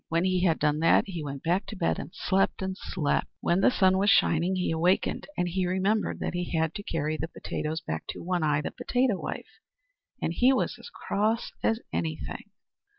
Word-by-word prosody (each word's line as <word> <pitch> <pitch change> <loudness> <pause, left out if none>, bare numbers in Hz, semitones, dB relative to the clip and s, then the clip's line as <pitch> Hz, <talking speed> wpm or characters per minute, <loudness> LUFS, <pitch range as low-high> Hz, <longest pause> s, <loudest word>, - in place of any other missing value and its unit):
When 165 +1 +1
he 185 -1 +2
had 165 -3 +3
done 150 0 +1
that 165 - +5
he 175 -5 -5
went 140 -2 -6
back 180 +5 +1
to - - -6
bed, 170 -4 0
and - - -6
slept, 195 +1 0
and 190 0 -2
slept. 165 -6 -1
When 175 +3 +1
the - - +6
sun 190 -6 +3
was 200 +2 +3
shining 175 -1 +3
he 180 -2 0
awakened, 170 +4 +1
and 180 - +1
he 180 +1 0
remembered 195 +4 0
that - - -2
he 175 -1 -2
had 160 0 +1
to - - -5
carry 155 -4 -2
the 160 - -3
potatoes 160 -1 -4
back 80 - -4
to - - -6
One 180 0 0
Eye, 150 -1 +2
the - - -4
potato 245 -5 0
wife; - - -6 0.6
and 165 - -1
he 250 +9 +4
was - - 0
as - - -10
cross 220 - -1
as 225 +1 +1
anything. 160 -2 -3
180 Hz, 210 wpm, -28 LUFS, 160-195 Hz, 0.6 s, the